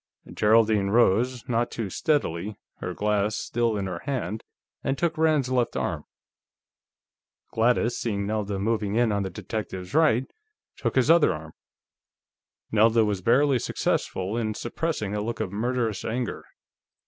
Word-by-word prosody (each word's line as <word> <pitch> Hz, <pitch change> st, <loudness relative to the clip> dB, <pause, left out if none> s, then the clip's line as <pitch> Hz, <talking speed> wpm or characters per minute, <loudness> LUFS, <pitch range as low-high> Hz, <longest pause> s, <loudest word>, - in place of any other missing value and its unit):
Geraldine 110 Hz, -2 st, +3 dB
rose, 120 Hz, +3 st, +2 dB
not 120 Hz, 0 st, +1 dB
too 110 Hz, -5 st, -4 dB
steadily, 105 Hz, -, -1 dB, 0.2 s
her -, -, -5 dB
glass 105 Hz, 0 st, +1 dB
still 115 Hz, -1 st, -1 dB
in 100 Hz, -, -2 dB
her 90 Hz, -3 st, -4 dB
hand, 110 Hz, -6 st, -3 dB, 0.4 s
and 135 Hz, +1 st, -1 dB
took 170 Hz, -1 st, 0 dB
Rand's 155 Hz, -5 st, +2 dB
left 125 Hz, -2 st, 0 dB
arm. -, -, -2 dB, 1.5 s
Gladys, 120 Hz, +1 st, +2 dB
seeing 100 Hz, -4 st, -2 dB
Nelda 105 Hz, -1 st, -2 dB
moving 105 Hz, 0 st, -1 dB
in 120 Hz, -1 st, +3 dB
on 100 Hz, -1 st, 0 dB
the 95 Hz, -, -2 dB
detective's 95 Hz, -1 st, -6 dB
right, 150 Hz, -5 st, +4 dB, 0.5 s
took -, -, -2 dB
his 130 Hz, +4 st, +4 dB
other 170 Hz, -1 st, +5 dB
arm. 80 Hz, 0 st, -10 dB, 1.2 s
Nelda 110 Hz, +1 st, +4 dB
was 100 Hz, -3 st, -1 dB
barely 130 Hz, +5 st, +3 dB
successful 95 Hz, -2 st, -1 dB
in 110 Hz, -2 st, -1 dB
suppressing 120 Hz, -4 st, -3 dB
a 105 Hz, -, -1 dB
look 115 Hz, +1 st, -4 dB
of 90 Hz, -, -2 dB
murderous 115 Hz, -1 st, -1 dB
anger. 120 Hz, +2 st, -3 dB
110 Hz, 140 wpm, -26 LUFS, 100-125 Hz, 1.5 s, other